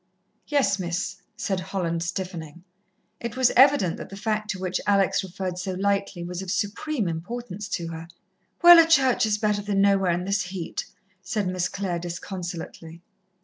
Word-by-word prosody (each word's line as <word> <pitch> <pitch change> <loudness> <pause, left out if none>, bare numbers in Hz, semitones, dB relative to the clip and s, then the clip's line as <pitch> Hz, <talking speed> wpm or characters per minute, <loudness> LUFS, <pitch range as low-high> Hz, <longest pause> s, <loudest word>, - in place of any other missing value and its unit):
"Yes, 235 -10 +2
Miss," 180 +2 -3 0.2
said 190 -2 -1
Holland, 180 -3 -2
stiffening. 175 -2 -5 0.6
It 235 +1 -5
was 260 -2 +4
evident 260 - +5
that - - -8
the 195 - -9
fact 215 0 -2
to 195 - -3
which 185 -1 -2
Alex 200 -2 +3
referred 185 -1 -5
so 185 +1 -3
lightly 195 -1 -1
was 175 +1 -5
of 190 - -7
supreme 215 - -1
importance 205 +4 -5
to 170 -5 -3
her. 165 0 -7 0.6
"Well, 345 0 +11
a 325 - +6
church 265 -7 +4
is 210 -1 +1
better 210 -1 0
than 205 -1 -1
nowhere 195 -2 +4
in 175 +1 0
this 195 +1 +1
heat," 180 -2 -5 0.4
said 215 -5 -2
Miss 180 -1 -1
Clare 185 -3 -3
disconsolately. 170 -1 -7
190 Hz, 165 wpm, -25 LUFS, 175-210 Hz, 0.6 s, Well